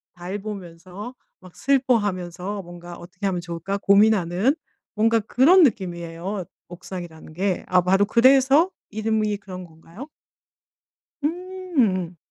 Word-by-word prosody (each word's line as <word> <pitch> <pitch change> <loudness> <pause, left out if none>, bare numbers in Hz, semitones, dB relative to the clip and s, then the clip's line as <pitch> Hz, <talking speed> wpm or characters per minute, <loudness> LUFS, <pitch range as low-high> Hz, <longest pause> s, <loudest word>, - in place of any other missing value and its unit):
달 180 +3 -5
보면서 195 +2 -8 0.3
막 185 -1 -16
슬퍼하면서 205 -8 0
뭔가 175 0 -10
어떻게 185 +3 -6
하면 185 -2 -1
좋을까 175 +3 -4
고민하는 200 - +3 0.4
뭔가 225 +1 +3
그런 285 - +5
느낌이에요 180 - -2 0.2
옥상이라는 175 -3 -9
게. 185 +2 -1
아마도 185 +2 +3
그래서 270 - +5 0.2
이름이 215 -1 -1
그런 185 -2 -9
건가요? 165 - -12 1.2
음. 310 - -1
195 Hz, 265 characters per minute, -23 LUFS, 175-225 Hz, 1.2 s, 그런